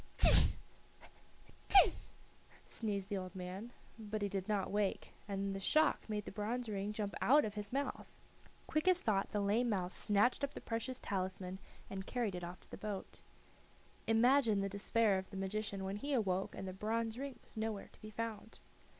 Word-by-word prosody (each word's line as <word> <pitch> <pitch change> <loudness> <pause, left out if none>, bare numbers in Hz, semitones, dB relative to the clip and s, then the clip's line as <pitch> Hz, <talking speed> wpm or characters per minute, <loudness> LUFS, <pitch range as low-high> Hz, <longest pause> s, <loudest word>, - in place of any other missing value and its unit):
"Atisha! - - +10 1.1
atisha!" 390 - +6 0.6
sneezed 200 -3 -4
the 200 -2 -1
old 185 0 -8
man, 190 +5 -6 0.3
but 215 -1 -4
he 200 - 0
did 195 +1 -4
not 205 -3 0
wake, 205 -1 -1
and 195 -1 -2
the - - -4
shock 310 +5 +2
made 210 -1 -3
the - - -7
bronze 230 +3 -3
ring 205 -1 -3
jump 210 -2 -4
out 290 +2 +5
of 210 - -4
his 210 -1 -6
mouth. 280 +2 -4 0.5
Quick 310 +3 -1
as 365 -1 +5
thought 200 - 0
the 210 - -2
lame 215 +5 +1
mouse 185 -4 -1
snatched 210 +7 +2
up 280 - -2
the - - -5
precious 240 +3 -4
talisman 185 -1 -4 0.3
and 195 0 -6
carried 235 -6 -1
it 180 -1 -5
off 175 +1 -8
to - - -19
the - - -7
boat. 205 -1 -6 0.9
Imagine 225 -1 +4
the 195 - -2
despair 200 0 +1
of 190 - -9
the 195 - -8
magician 195 0 -3
when 195 +1 -3
he 285 +6 -3
awoke 195 -6 0
and 190 - -6
the 185 - -5
bronze 225 +4 -2
ring 275 -1 -6
was - - -17
nowhere 220 -2 -4
to - - -21
be 215 - -9
found! 220 0 -6
210 Hz, 185 wpm, -35 LUFS, 195-230 Hz, 1.1 s, Atisha